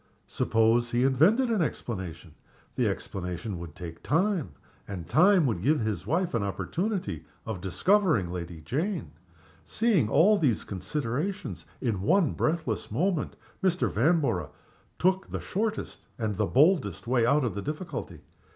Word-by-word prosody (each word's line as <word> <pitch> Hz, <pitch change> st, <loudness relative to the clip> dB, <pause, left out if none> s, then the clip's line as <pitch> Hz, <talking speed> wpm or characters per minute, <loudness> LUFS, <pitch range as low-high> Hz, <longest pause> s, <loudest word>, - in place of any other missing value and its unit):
Suppose 115 Hz, +2 st, +2 dB
he 120 Hz, +1 st, +1 dB
invented 185 Hz, -, +4 dB
an 215 Hz, -5 st, +2 dB
explanation? 95 Hz, -, -4 dB, 0.4 s
The -, -, +1 dB
explanation 90 Hz, +1 st, -4 dB
would 85 Hz, -3 st, -8 dB
take 85 Hz, -2 st, -8 dB
time, 170 Hz, -, 0 dB, 0.3 s
and 90 Hz, -5 st, -6 dB
time 180 Hz, -, +5 dB
would 110 Hz, -9 st, 0 dB
give 150 Hz, +7 st, +3 dB
his 105 Hz, -4 st, -2 dB
wife 170 Hz, +6 st, 0 dB
an 115 Hz, -, +1 dB
opportunity 160 Hz, -, -2 dB, 0.2 s
of 110 Hz, -5 st, -4 dB
discovering 155 Hz, -, +2 dB
Lady 85 Hz, -2 st, -6 dB
Jane. 160 Hz, -, -2 dB, 0.5 s
Seeing 185 Hz, -, +1 dB
all 205 Hz, -, +5 dB
these 125 Hz, -9 st, +1 dB
considerations 120 Hz, -, -3 dB
in 110 Hz, -7 st, -1 dB
one 175 Hz, -, +3 dB
breathless 155 Hz, -9 st, -1 dB
moment, 165 Hz, -, 0 dB, 0.3 s
Mr. 185 Hz, -2 st, +2 dB
Vanborough 135 Hz, -, +1 dB, 0.5 s
took 190 Hz, +1 st, +2 dB
the -, -, -3 dB
shortest 215 Hz, +2 st, -3 dB
and 110 Hz, -3 st, -2 dB
the 105 Hz, +1 st, 0 dB
boldest 155 Hz, +2 st, +3 dB
way 120 Hz, 0 st, +2 dB
out 145 Hz, +5 st, +3 dB
of 115 Hz, -6 st, -1 dB
the 100 Hz, -, -4 dB
difficulty. 155 Hz, -, -5 dB
130 Hz, 140 wpm, -28 LUFS, -, 0.5 s, time